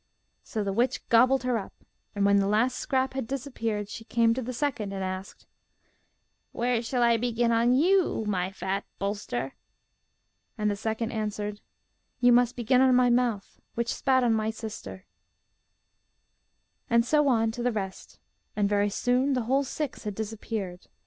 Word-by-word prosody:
So 215 - -4
the 195 -1 -2
witch 245 +5 0
gobbled 255 +3 +5
her 250 -2 +1
up, 195 - -9 0.4
and 200 -1 +1
when 200 0 +5
the 195 0 +2
last 235 +5 +1
scrap 265 -1 0
had 265 -4 -3
disappeared, 230 -6 -3
she 225 - -8
came 230 0 +2
to 260 - -3
the 250 +1 -4
second 240 -6 -2
and 195 -1 -3
asked: 185 +1 -6 1.1
'Where 240 -1 0
shall 245 +1 0
I 235 -1 +4
begin 235 0 0
on 235 +2 +3
you, 340 - +2
my 185 -3 -1
fat 195 +1 -3
bolster?' 195 - -3 1.0
And 210 -1 +1
the - - -1
second 220 +2 -2
answered, 210 -1 -3 0.6
'You 245 -1 +5
must 245 0 +4
begin 250 +2 +2
on 260 -1 +5
my 250 -1 +4
mouth, 240 -5 0
which 235 0 -1
spat 260 -1 +2
on 235 -2 +3
my 220 0 0
sister.' 220 -3 -7 1.8
And 235 0 +4
so 295 +2 +3
on 225 -4 +2
to 240 +2 -6
the 245 +1 +1
rest; 195 -4 -6 0.4
and 205 -1 +2
very 205 0 +2
soon 250 +6 +1
the 250 -2 0
whole 265 +5 +2
six 280 +1 -4
had 210 -2 -4
disappeared. 210 -4 -5
230 Hz, 165 wpm, -27 LUFS, 205-250 Hz, 1.8 s, gobbled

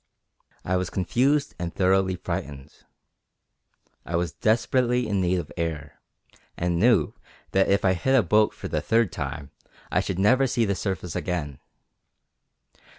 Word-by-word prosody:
I 90 +1 +1
was 90 -1 -2
confused 135 - +1
and 85 -1 -3
thoroughly 95 0 +2
frightened. 70 -4 -6 1.3
I 85 - -4
was 85 -2 0
desperately 120 - +1
in 100 -3 0
need 90 0 +1
of 85 -4 -5
air, 75 -5 -4 0.6
and 85 0 0
knew 105 -8 +3 0.4
that 95 0 +2
if 100 0 +2
I 95 - +4
hit 130 +9 +2
a 120 - +4
boat 105 +5 +3
for - - -8
the - - -2
third 115 -4 +2
time 70 -1 -5 0.4
I - - +2
should 95 - -2
never 130 +8 +4
see 120 -2 +1
the 100 - 0
surface 95 -3 -4
again. 75 -7 -3
95 Hz, 150 wpm, -25 LUFS, 85-110 Hz, 1.3 s, I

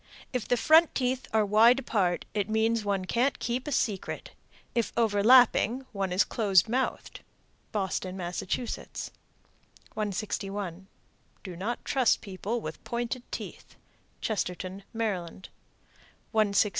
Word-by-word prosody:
If 250 -4 -2
the 245 - +2
front 320 +6 +5
teeth 255 0 -1
are 220 -1 +3
wide 220 +5 +6
apart, 200 -9 0
it 205 -1 -1
means 220 +1 +1
one 200 -2 -1
can't 250 +8 +1
keep 245 +4 -3
a - - -2
secret. 210 -8 -2 0.4
If 235 -3 0
overlapping, 235 +3 +5
one 195 -4 -2
is 185 +3 +4
close 200 -4 +3
mouthed. 255 +4 -2 0.5
Boston, 190 -2 -2
Mass. 175 -1 -3
161. 200 -3 -5 0.6
Do 185 -3 -7
not 210 +8 -4
trust 260 -3 +2
people 205 +4 -3
with - - -7
pointed 240 +1 -3
teeth. - - -7 0.5
Chestertown, 185 -2 -3
Md. 190 -5 -3 0.9
162. 210 -2 +3
215 Hz, 120 wpm, -28 LUFS, 195-240 Hz, 0.9 s, wide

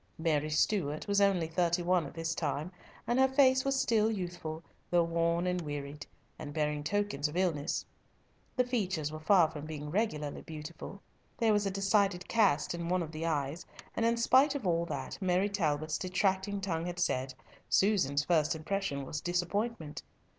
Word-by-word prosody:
Mary 155 -2 0
Stuart 155 0 0
was 200 0 +2
only 195 -4 +3
thirty 175 +1 0
one 175 -3 +2
at 140 - -12
this 165 0 -2
time, 155 +1 -2 0.3
and 240 +2 +1
her 265 - +6
face 260 -1 +4
was 275 0 +1
still 225 -4 +3
youthful, 175 -5 -4 0.3
though 175 -1 +4
worn 170 +1 +1
and 180 0 0
wearied, 145 -1 -6 0.3
and 145 -1 -7
bearing 150 -1 0
tokens 185 -4 0
of 150 +4 -6
illness. 170 -4 0 0.7
The 250 - +3
features 190 - -1
were 155 - -6
far 165 0 +4
from 155 -1 -7
being 150 -1 -6
regularly 155 -8 -1
beautiful; 160 +5 -9 0.3
there 225 -2 +3
was 205 -1 +2
a - - +1
decided 195 -1 +1
cast 195 -12 +2
in 170 0 -4
one 180 -1 +1
of 160 - -7
the 165 +1 -3
eyes, 145 +1 -1 0.3
and - - 0
in 230 +1 +3
spite 265 +5 +4
of 270 -7 -4
all 170 -1 +1
that - - -5
Mary 185 +2 +2
Talbot's 155 -6 -1
detracting 190 +1 0
tongue 170 -3 -2
had 175 0 -5
said, 130 -7 -1 0.3
Susan's 160 -9 +3
first 160 -2 +2
impression 160 -4 -2
was 145 +3 -4
disappointment. 175 - -2
175 Hz, 175 wpm, -31 LUFS, 155-200 Hz, 0.7 s, her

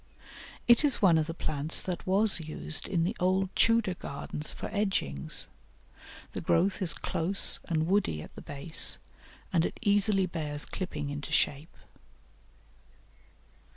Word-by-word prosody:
It 240 +3 +5
is 285 -4 +4
one 175 -5 +4
of 155 - -1
the 165 - -4
plants 155 -1 +1
that 180 -1 -5
was 195 +1 +4
used 155 0 -4
in 170 -3 0
the 190 +7 -2
old 185 +1 0
Tudor 230 -4 +3
gardens 150 -2 -5
for - - -8
edgings; 190 - -1 0.9
the - - -5
growth 190 +4 +1
is 165 -5 +2
close 185 +4 +1
and 160 -3 -1
woody 175 - 0
at - - -14
the - - -11
base, 145 +3 +3 0.6
and 165 -2 +3
it - - -4
easily 205 -2 +3
bears 150 -4 -4
clipping 150 -6 -5
into 145 0 -7
shape. 145 +4 -1
175 Hz, 140 wpm, -29 LUFS, 155-195 Hz, 0.9 s, It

